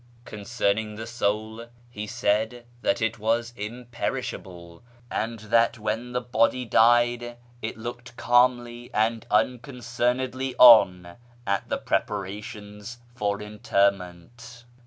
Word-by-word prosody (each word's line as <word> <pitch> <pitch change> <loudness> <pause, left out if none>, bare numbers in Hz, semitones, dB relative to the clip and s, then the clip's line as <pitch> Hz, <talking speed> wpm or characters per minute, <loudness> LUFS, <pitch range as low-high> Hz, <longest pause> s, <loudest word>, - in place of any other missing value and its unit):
Concerning 105 0 -2
the 110 +1 -6
soul, 110 0 -2 0.2
he 105 -2 -6
said 110 +2 -1 0.2
that - - 0
it 115 0 -1
was 115 +2 0
imperishable, 105 -6 -6 0.3
and 115 +1 -2
that 115 +2 +2
when 110 +3 -3
the 125 - -1
body 125 +1 +1
died 120 +1 +3 0.2
it 110 0 -5
looked 120 +1 -8
calmly 120 -1 +2
and 110 +1 0
uncon 115 +4 +2 0.2
cernedly 125 +2 -2
on 90 -8 +7 0.3
at 100 0 -1
the - - 0
preparations 105 +2 -4 0.2
for 105 -4 -2
interment. 100 +3 -2
115 Hz, 110 wpm, -25 LUFS, 105-120 Hz, 0.3 s, on